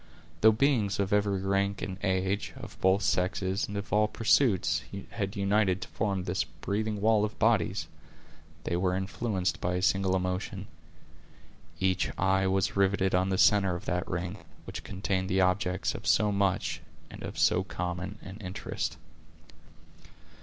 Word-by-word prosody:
Though 110 Hz, -, +8 dB
beings 110 Hz, -4 st, +1 dB
of 100 Hz, 0 st, 0 dB
every 100 Hz, -2 st, +2 dB
rank 100 Hz, 0 st, 0 dB
and 95 Hz, -1 st, -5 dB
age, 95 Hz, +1 st, -1 dB
of -, -, -9 dB
both 95 Hz, +2 st, +3 dB
sexes, 95 Hz, +2 st, 0 dB
and 100 Hz, -, -5 dB
of 100 Hz, -, -5 dB
all 105 Hz, 0 st, +4 dB
pursuits, 115 Hz, -2 st, +2 dB, 0.3 s
had 100 Hz, -2 st, -3 dB
united 100 Hz, -1 st, +2 dB
to -, -, -8 dB
form 100 Hz, -4 st, -1 dB
this 90 Hz, -1 st, -1 dB
breathing 100 Hz, +7 st, -3 dB
wall 110 Hz, -1 st, +4 dB
of 105 Hz, -, -3 dB
bodies, 100 Hz, -6 st, +2 dB, 0.8 s
they 85 Hz, -, -1 dB
were 90 Hz, +1 st, +1 dB
influenced 95 Hz, 0 st, -2 dB
by 90 Hz, +1 st, 0 dB
a 90 Hz, -, -1 dB
single 95 Hz, -1 st, +2 dB
emotion. 90 Hz, 0 st, -2 dB, 1.1 s
Each 95 Hz, -1 st, +1 dB
eye 95 Hz, +1 st, +2 dB
was 95 Hz, 0 st, +1 dB
riveted 100 Hz, -1 st, +2 dB
on 90 Hz, +1 st, +2 dB
the 95 Hz, -, 0 dB
center 100 Hz, -3 st, +4 dB
of 85 Hz, -, -7 dB
that 90 Hz, 0 st, -1 dB
ring, 90 Hz, +2 st, -3 dB, 0.3 s
which -, -, -7 dB
contained 95 Hz, -1 st, -2 dB
the 95 Hz, +1 st, +2 dB
objects 90 Hz, 0 st, +1 dB
of -, -, -7 dB
so 105 Hz, 0 st, +4 dB
much 100 Hz, -2 st, 0 dB, 0.3 s
and -, -, -10 dB
of -, -, -6 dB
so 95 Hz, -, +3 dB
common 90 Hz, +2 st, -4 dB
an 95 Hz, +2 st, -9 dB
interest. 95 Hz, -4 st, -4 dB
95 Hz, 155 wpm, -29 LUFS, 90-100 Hz, 1.1 s, Though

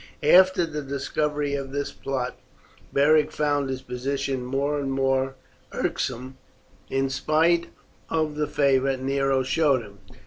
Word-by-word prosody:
After 185 Hz, -1 st, +6 dB
the 150 Hz, -2 st, -5 dB
discovery 145 Hz, +1 st, -2 dB
of 135 Hz, -1 st, -3 dB
this 145 Hz, +1 st, -3 dB
plot 130 Hz, -2 st, -3 dB, 0.6 s
Beric 150 Hz, +2 st, +4 dB
found 145 Hz, -2 st, 0 dB
his 130 Hz, 0 st, -4 dB
position 135 Hz, +1 st, -3 dB
more 140 Hz, +3 st, -1 dB
and 135 Hz, -1 st, -2 dB
more 135 Hz, 0 st, 0 dB, 0.4 s
irksome 130 Hz, +2 st, -3 dB, 0.5 s
in 135 Hz, 0 st, 0 dB
spite 160 Hz, +5 st, +2 dB, 0.4 s
of 155 Hz, -2 st, 0 dB
the 150 Hz, 0 st, -1 dB
favour 135 Hz, -1 st, +2 dB
Nero 135 Hz, 0 st, +1 dB
showed 135 Hz, -2 st, +2 dB
him. 100 Hz, -1 st, -14 dB
140 Hz, 130 wpm, -25 LUFS, 135-150 Hz, 0.6 s, After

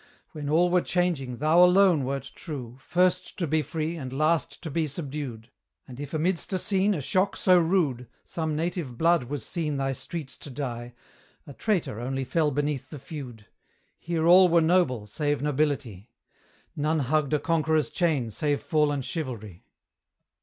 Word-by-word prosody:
When 145 Hz, -2 st, -5 dB
all 175 Hz, +3 st, +3 dB
were 180 Hz, 0 st, +4 dB
changing, 165 Hz, -10 st, -1 dB
thou 155 Hz, +5 st, +5 dB
alone 180 Hz, -4 st, +5 dB
wert 135 Hz, 0 st, -4 dB
true, 130 Hz, -8 st, -7 dB
First 180 Hz, +5 st, 0 dB
to 180 Hz, -, -1 dB
be 155 Hz, 0 st, +1 dB
free, 160 Hz, +3 st, -3 dB
and 130 Hz, -5 st, -6 dB
last 155 Hz, +4 st, 0 dB
to 160 Hz, -, -5 dB
be 160 Hz, +1 st, 0 dB
subdued. 140 Hz, -6 st, -6 dB, 0.4 s
And 125 Hz, -1 st, -10 dB
if 145 Hz, -, -6 dB
amidst 170 Hz, +4 st, 0 dB
a -, -, +2 dB
scene, 195 Hz, +2 st, +2 dB
a 150 Hz, -, -3 dB
shock 185 Hz, +8 st, +1 dB
so 185 Hz, -1 st, +5 dB
rude, 160 Hz, -8 st, +1 dB, 0.2 s
Some 160 Hz, -2 st, -3 dB
native 160 Hz, -6 st, -3 dB
blood 165 Hz, -3 st, +3 dB
was 140 Hz, -2 st, -5 dB
seen 155 Hz, -4 st, -2 dB
thy 135 Hz, 0 st, -1 dB
streets 135 Hz, +2 st, -6 dB
to -, -, -9 dB
dye, 120 Hz, -3 st, -5 dB, 0.5 s
A 145 Hz, -, -10 dB
traitor 180 Hz, -, -1 dB
only 135 Hz, +2 st, -2 dB
fell 150 Hz, +4 st, +1 dB
beneath 145 Hz, -2 st, -2 dB
the 150 Hz, -, -8 dB
feud: 130 Hz, -6 st, -9 dB, 0.5 s
Here 165 Hz, -1 st, -1 dB
all 180 Hz, +2 st, +7 dB
were 170 Hz, 0 st, +5 dB
noble, 160 Hz, -, +2 dB
save 145 Hz, +6 st, -2 dB
nobility; 140 Hz, -8 st, -1 dB, 0.7 s
None 155 Hz, +1 st, 0 dB
hugged 150 Hz, +2 st, 0 dB
a -, -, +1 dB
conqueror's 160 Hz, -1 st, +1 dB
chain 150 Hz, -10 st, 0 dB
save 145 Hz, +3 st, 0 dB
fallen 150 Hz, -3 st, +1 dB
Chivalry! 115 Hz, -, -6 dB
150 Hz, 165 wpm, -26 LUFS, 135-170 Hz, 0.7 s, all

